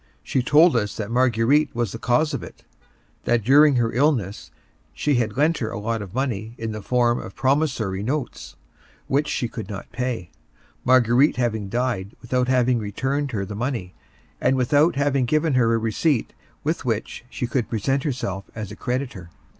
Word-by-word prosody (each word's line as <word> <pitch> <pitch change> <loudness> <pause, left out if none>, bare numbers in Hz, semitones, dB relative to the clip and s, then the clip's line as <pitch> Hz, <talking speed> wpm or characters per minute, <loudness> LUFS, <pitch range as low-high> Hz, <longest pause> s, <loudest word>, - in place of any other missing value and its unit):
She 130 - 0
told 150 +4 +5
us 105 -3 -1
that 110 0 -4
Marguerite 125 +4 +2
was 120 -4 -1
the 115 - -7
cause 125 +7 +1
of - - -2
it; - - -11 0.6
that 120 -2 +2
during 145 +4 +6
her 115 -2 +1
illness 110 - 0 0.5
she 145 - +1
had 115 -1 -1
lent 155 +3 +2
her 110 - -2
a - - -5
lot 110 +2 -2
of 100 0 -9
money 115 -4 -2
in 115 -1 -4
the 110 0 -5
form 120 +2 +2
of - - -9
promissory 130 -9 0
notes, 130 +3 -4 0.5
which 145 +3 +1
she 120 - -1
could 115 -1 -7
not 100 -2 -7
pay, 120 -7 -3 0.5
Marguerite 130 +2 +4
having 110 -5 -1
died 115 -4 -2
without 125 +1 0
having 125 -1 +2
returned 135 +7 -2
her 105 -6 -2
the 105 - -7
money, 115 -5 -3 0.5
and 135 - +3
without 145 +6 +3
having 140 -2 +1
given 155 +3 +1
her 120 -3 +3
a 115 - +3
receipt 115 +4 0 0.3
with - - -1
which - - -3
she - - -3
could 120 -1 -1
present 135 +5 0
herself 110 - -3
as 110 -3 -6
a - - -7
creditor. 125 -9 -4
120 Hz, 180 wpm, -23 LUFS, 110-135 Hz, 0.6 s, during